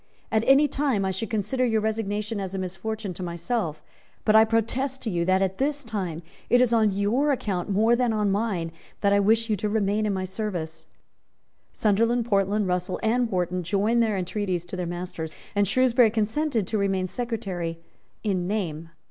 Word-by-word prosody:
At 220 0 +2
any 275 +2 +6
time, 270 -8 0
I 190 - 0
should 190 +4 -4
consider 220 +4 0
your 225 -3 +2
resignation 215 0 -2
as 195 -1 -4
a - - -2
misfortune 190 +2 -4
to 175 - -9
myself 170 -1 -3 0.4
but 215 - +4
I 220 0 +8
protest 245 +4 -1
to 225 - -2
you 170 -1 0
that, 190 +1 +3
at 190 0 -2
this 290 +1 0
time, 185 -8 -4 0.3
it 245 - +5
is 250 -2 +3
on 220 -2 +4
your 210 +9 +1
account 200 -8 -2
more 220 +4 +3
than 245 -1 +1
on 210 -2 +1
mine 195 -6 -1 0.3
that 200 -1 +3
I 200 - +4
wish 225 +3 +3
you 215 - +1
to 210 +3 -1
remain 210 0 +1
in 205 - 0
my 185 0 -2
service." 180 -5 -4 0.8
Sunderland, 230 +3 +2
Portland, 200 -1 +1
Russell 180 0 -1
and 235 +2 +2
Wharton 180 -1 -1
joined 205 +6 +1
their 220 -3 +1
entreaties 185 -1 -2
to 175 - -7
their 180 -1 -3
master's; 175 -2 -5 0.2
and 205 0 +3
Shrewsbury 245 +1 +4
consented 225 +2 0
to 215 +3 -1
remain 195 -2 +1
Secretary 190 -6 -3 0.5
in 185 -4 0
name. 165 -6 -3
205 Hz, 185 wpm, -25 LUFS, 185-225 Hz, 0.8 s, I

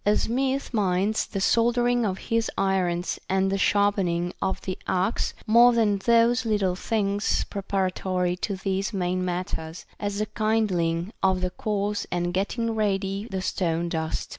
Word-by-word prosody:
A 210 +1 +3
smith 265 +3 -1
minds 200 0 +1
the 195 - -4
soldering 240 +2 +2
of 190 -1 -2
his 230 +1 -1
irons 185 -2 0
and 190 0 +2
the 195 - +1
sharpen 205 -1 +2
ing 175 +1 -1
of 190 - -1
the 185 - -4
axe 190 +4 0
more 240 +2 +6
than 215 -4 +2
those 235 +3 +3
little 205 -5 +1
things 205 0 0
preparatory 185 -2 -1
to 200 +2 -2
these 195 +3 -2
main 185 -1 -1
matters, 175 -2 -4
as 205 -1 -3
the 215 - 0
kindling, 205 -5 0
of 190 -1 +2
the 180 0 -1
coals 205 0 -2
and 175 0 -1
getting 225 +5 -1
ready 200 -1 -1
the 190 -1 -3
stone 170 -2 -1
dust. 160 -1 -3
195 Hz, 155 wpm, -25 LUFS, 185-215 Hz, -, more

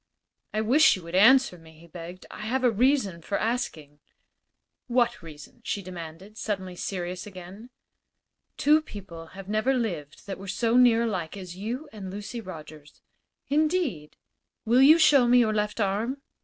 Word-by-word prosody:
"I 215 - -1
wish 265 +9 +5
you 185 - -9
would 170 +1 -10
answer 230 0 +5
me," 160 -1 -17
he 165 - -16
begged. 175 +2 -10
"I - - -9
have 260 +3 -1
a 245 - +4
reason 225 -6 +1
for 200 +5 -2
asking." 165 - -3 0.9
"What 240 -1 +1
reason?" 155 +6 -13
she 200 -3 -3
demanded, 180 +3 -9
suddenly 190 -4 -4
serious 180 0 -5
again. 190 +4 -11 0.9
"Two 305 +2 +4
people 175 - -10
have 195 -1 -9
never 215 +6 +1
lived 170 - -4
that 195 -2 -6
were 195 - -9
so 225 +4 0
near 240 -2 +5
alike 190 -6 -3
as 180 -2 -8
you 235 +10 -5
and 200 -3 -7
Lucy 205 +5 -6
Rogers." 155 -6 -11 0.5
"Indeed?" 295 - 0 0.5
"Will 240 +3 +4
you 300 +4 +8
show 295 -6 +5
me 245 +1 +5
your 225 -3 +3
left 210 +1 -2
arm?" 215 +7 -1
205 Hz, 160 wpm, -26 LUFS, 180-245 Hz, 0.9 s, you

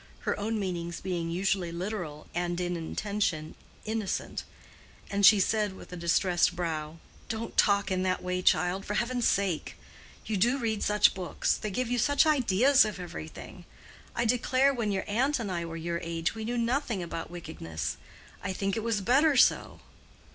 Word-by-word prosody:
Her - - -1
own 220 +1 -1
meanings 170 -3 -3
being 175 -3 -3
usually 180 0 0
literal 175 -4 -5
and 175 0 -1
in 175 0 -1
intention 170 -2 -2 0.3
innocent; 220 -3 -3 0.7
and 200 0 0
she 205 +1 +9
said 210 +1 +1
with 180 - -12
a - - -4
distressed 175 +1 +2
brow: 160 -2 -3 0.3
"Don't 225 0 -4
talk 200 -2 +3
in 185 0 +1
that 185 -1 0
way, 180 0 -1
child, 180 +1 +2
for 210 - -3
heaven's 240 +1 +1
sake! 190 -5 0 0.5
you 215 - -1
do 240 +8 +3
read 225 -5 -1
such 210 0 +4
books—they 185 +3 -1
give 245 +4 -2
you 245 - +1
such 285 +6 +4
ideas 265 -3 +5
of 210 -3 -4
everything. 80 - -8 0.5
I 235 - +1
declare 255 +3 +3
when 230 -5 -1
your 190 -1 -1
aunt 260 +8 +1
and 220 -6 -4
I 170 -1 -2
were 165 0 -6
your 170 +1 -3
age 165 0 -2
we 220 -1 -6
knew 240 +2 -2
nothing 235 -4 0
about 165 -1 -5
wickedness. 160 - -5 0.5
I - - -2
think 195 +1 -1
it 225 - -1
was 225 -3 0
better 275 +7 +4
so." - - +3
195 Hz, 170 wpm, -29 LUFS, 175-225 Hz, 0.7 s, she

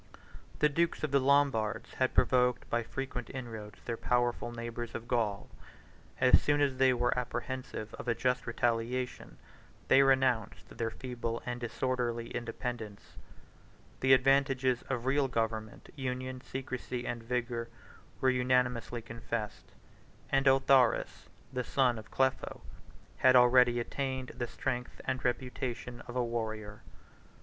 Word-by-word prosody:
The 150 - +4
dukes 165 +3 0
of 155 - -1
the 140 - +4
Lombards 130 -5 +2
had 130 -1 0
provoked 125 -1 +3
by 120 - +2
frequent 125 +1 -5
inroads 110 -5 -7
their 115 -1 -3
powerful 120 0 0
neighbors 120 0 -6
of 115 - -6
Gaul. 110 -5 0 0.7
As 130 -1 +6
soon 145 0 +2
as 140 -3 +1
they 130 0 +5
were 125 0 +1
apprehensive 125 -2 -4
of - - -8
a 115 - +2
just 125 +1 0
retaliation, 120 +2 -1 0.5
they 135 - +7
renounced 130 -5 +1
their 115 - -1
feeble 115 -1 -4
and 120 0 -3
disorderly 120 -1 -2
independence: 115 -3 -5 0.8
the 130 0 +5
advantages 130 -1 +3
of 125 -2 -2
real 135 +1 +2
government, 110 -3 -3
union, 130 -1 -4
secrecy, 125 -1 -5
and 120 -1 -3
vigor, 120 0 -2 0.5
were 130 - +4
unanimously 125 -2 +1
confessed; 115 -1 -5 0.6
and 135 0 +3
Autharis, 135 -2 +3 0.3
the 125 -1 -1
son 125 -3 +2
of 110 - -12
Clepho, 130 -1 0 0.6
had 130 0 +5
already 125 -1 +6
attained 130 +1 -3
the 120 - -4
strength 125 -1 -4
and 130 0 -2
reputation 125 -1 -3
of 120 - -8
a 125 - +2
warrior. 110 -3 -4
125 Hz, 130 wpm, -31 LUFS, 115-130 Hz, 0.8 s, they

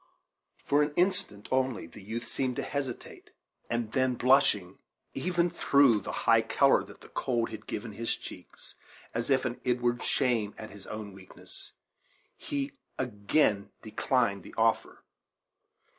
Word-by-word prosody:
For 145 +1 +4
an 150 0 0
instant 115 - 0
only 130 -7 +1
the 85 - -12
youth 110 +4 -5
seemed 130 -2 -1
to - - -2
hesitate, 135 -3 -5 0.4
and 115 -2 -1
then, 130 0 +2
blushing 120 -8 +3 0.3
even 175 -1 +1
through 140 -6 +5
the - - -5
high - - +6
color - - +4
that - - -14
the - - -14
cold 120 -3 -1
had 110 - -8
given 115 +1 -4
to 100 - -13
his 115 0 -1
cheeks, - - -11 0.4
as 115 +3 -2
if 130 -1 +3
with 125 -2 -3
inward 120 -1 +1
shame 115 -5 +1
at 110 - -8
his 100 -2 -12
own 105 -2 -6
weakness, 95 - -10 0.6
he 285 -2 -3 0.3
again 105 -2 +1
declined 110 -2 +1
the - - -13
offer. 115 0 +1
120 Hz, 145 wpm, -30 LUFS, 105-135 Hz, 0.6 s, high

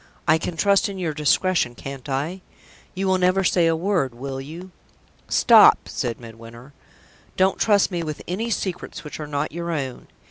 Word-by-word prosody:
I 160 0 +4
can 165 +1 -5
trust 200 +2 +3
in 195 - -7
your 170 -4 -2
discretion, 150 -2 +1
can't 135 +1 -8
I? 150 +8 -3 0.5
You 190 +1 -2
will 190 -1 +2
never 185 +1 +2
say 175 -2 +3
a 165 - +2
word, 165 -8 -1
will 135 +2 -5
you?" 170 +7 -10 0.6
"Stop!" - - +6
said 120 -1 -3
Midwinter. 115 +3 -12 0.6
"Don't 190 +1 +2
trust 205 -2 +3
me 175 -1 -2
with 155 -2 -5
any 215 +7 -3
secrets 185 -5 -4
which 150 - -8
are 150 - -5
not 145 +1 -2
your 170 +1 -5
own. 135 -6 -4
165 Hz, 175 wpm, -23 LUFS, 135-185 Hz, 0.6 s, Stop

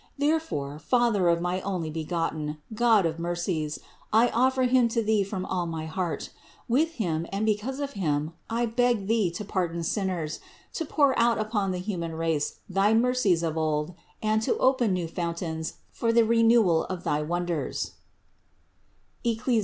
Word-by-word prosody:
Therefore, 285 - -1
Father 215 +1 +2
of 170 0 +2
my 180 +1 -1
Onlybegotten, 160 -3 -2 0.2
God 220 -4 +4
of 165 0 -2
mercies, 170 -3 -2 0.3
I 230 +3 +5
offer 260 +2 +2
Him 250 -1 +4
to 230 0 0
Thee 215 -1 +2
from 190 -1 -4
all 180 -2 -2
my 160 -1 -4
heart; 165 -1 -3 0.4
with 310 +8 +2
Him 170 - -2
and 200 +2 -1
because 220 +6 -1
of 285 -1 -3
Him 155 -4 -1 0.2
I 235 +1 +1
beg 235 -2 +1
Thee 215 -3 +2
to 175 +5 -6
pardon 170 -4 -2
sinners, 175 -4 -2 0.3
to 325 - -2
pour 285 -2 +3
out 235 0 +4
upon 215 -2 -1
the 185 - -1
human 180 -4 -4
race 160 -2 -1
thy 195 +3 +3
mercies 230 -8 +2
of 160 -1 -1
old 155 +1 0 0.3
and 215 0 +2
to - - 0
open 255 -5 +3
new 180 -2 -1
fountains 165 -1 -3 0.2
for 230 - 0
the 230 0 +5
renewal 225 -7 +4
of 185 -1 -5
thy 150 - 0
wonders 175 0 -2 1.3
(Eccli. 235 0 +1
190 Hz, 160 wpm, -27 LUFS, 165-230 Hz, 1.3 s, I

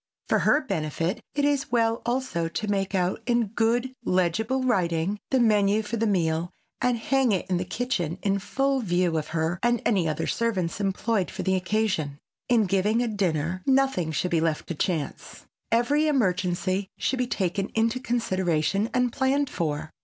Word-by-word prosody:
For - - +3
her 295 - +3
benefit 175 - -2
it 285 -1 +2
is 285 -3 0
well 230 -1 +2
also 240 -9 -1
to 210 +6 -4
make 195 -1 -1
out 180 0 0
in 235 -3 +2
good 235 +4 0
legible 215 +9 +1
writing, 185 -4 0
the 265 - +2
menu 210 -2 +3
for 215 +2 -4
the 225 0 0
meal 170 -3 +1 0.3
and 250 -1 +2
hang 260 +1 +2
it 190 -3 0
in 180 - +2
the 180 - -2
kitchen 180 -7 -2
in 200 0 +1
full 270 +7 0
view 175 -6 +1
of 155 -1 -1
her 165 +2 -1
and 240 0 +2
any 190 -7 +2
other 155 +1 -2
servants 205 -5 -1
employed 195 0 0
for - - -5
the 190 - +1
occasion. 185 -6 0 0.3
In 230 -3 +4
giving 205 +5 +2
a - - -1
dinner 185 -4 -1
nothing 265 -11 +2
should 180 +4 -1
be 165 -2 +2
left 160 -2 0
to - - -1
chance. 160 -2 -3 0.3
Every 280 +7 +3
emergency 190 -6 0
should 265 - -1
be 250 - +1
taken 195 -3 -1
into 225 +2 +1
consideration 195 - 0
and 250 -1 +2
planned 275 +1 +1
for. 155 -1 -3
200 Hz, 175 wpm, -26 LUFS, 175-240 Hz, 0.3 s, In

